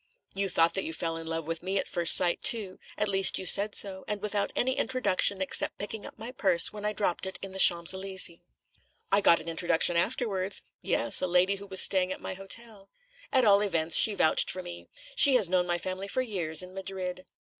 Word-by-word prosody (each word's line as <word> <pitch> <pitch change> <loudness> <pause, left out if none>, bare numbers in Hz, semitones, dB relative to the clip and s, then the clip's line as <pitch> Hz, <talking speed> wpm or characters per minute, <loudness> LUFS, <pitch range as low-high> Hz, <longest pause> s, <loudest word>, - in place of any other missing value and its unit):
"You 195 0 -2
thought 165 -1 +2
that 195 - -1
you 160 - -6
fell 165 +1 -5
in 165 0 -9
love 165 -1 -5
with 165 +1 -5
me 190 +2 -3
at - - -2
first 170 -2 +4
sight, 175 -2 +2
too; 205 -5 +2 0.2
at 210 - -1
least, 195 -1 +3
you 190 - -6
said 205 +4 +4
so, 190 -2 +1
and 210 -1 -4
without 205 0 -3
any 260 +1 -1
introduction 200 -8 0
except 185 - -1
picking 205 +1 -7
up - - -14
my 225 +3 -8
purse 190 -9 +1
when 210 -1 -10
I 210 - 0
dropped 195 -3 -2
it 190 - -6
in 195 - -7
the 190 - -9
Champs 170 -1 +4
Élysées." 190 -2 -5 0.7
"I 200 - +3
got 170 - +4
an 160 - -12
introduction 170 +1 -1
afterwards." 195 0 -2 0.2
"Yes, - - +2
a 185 - -1
lady 180 +3 +2
who 200 +1 -12
was 190 -1 +2
staying 185 -1 +1
at - - -6
my - - -7
hotel." 195 +1 -7 0.4
"At 260 -3 +3
all 200 -1 +4
events, 170 -5 -1
she 215 - +8
vouched 160 - +2
for 185 - -6
me. 175 -1 -11 0.3
She 280 - +6
has 220 -7 +2
known 180 0 -1
my 175 0 -1
family 185 +3 -6
for 255 +6 -3
years, 175 -8 -2
in 180 0 -13
Madrid." 185 -1 -7
190 Hz, 220 wpm, -27 LUFS, 175-205 Hz, 0.7 s, she